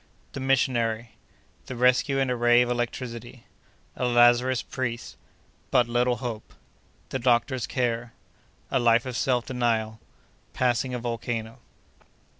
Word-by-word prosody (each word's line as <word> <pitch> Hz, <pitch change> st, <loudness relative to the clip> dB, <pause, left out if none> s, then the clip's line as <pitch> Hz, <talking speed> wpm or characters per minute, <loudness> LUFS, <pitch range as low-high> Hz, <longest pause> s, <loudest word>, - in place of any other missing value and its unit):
—The -, -, -5 dB
Missionary.—The 120 Hz, -2 st, -2 dB
Rescue 125 Hz, +3 st, +3 dB
in 135 Hz, -1 st, +1 dB
a -, -, 0 dB
Ray 120 Hz, 0 st, +5 dB
of 125 Hz, -, -2 dB
Electricity.—A 120 Hz, -, -7 dB
Lazarist 120 Hz, +1 st, +4 dB
Priest.—But 120 Hz, 0 st, -3 dB
little 120 Hz, +1 st, +1 dB
Hope.—The 120 Hz, +2 st, -9 dB
Doctor's 125 Hz, +1 st, +1 dB
Care.—A 120 Hz, +1 st, -4 dB
Life 120 Hz, 0 st, +3 dB
of 130 Hz, -2 st, -5 dB
Self 125 Hz, -1 st, +1 dB
Denial.—Passing 120 Hz, +1 st, -2 dB
a -, -, -1 dB
Volcano. 115 Hz, -1 st, -4 dB
120 Hz, 95 wpm, -26 LUFS, 115-125 Hz, -, Ray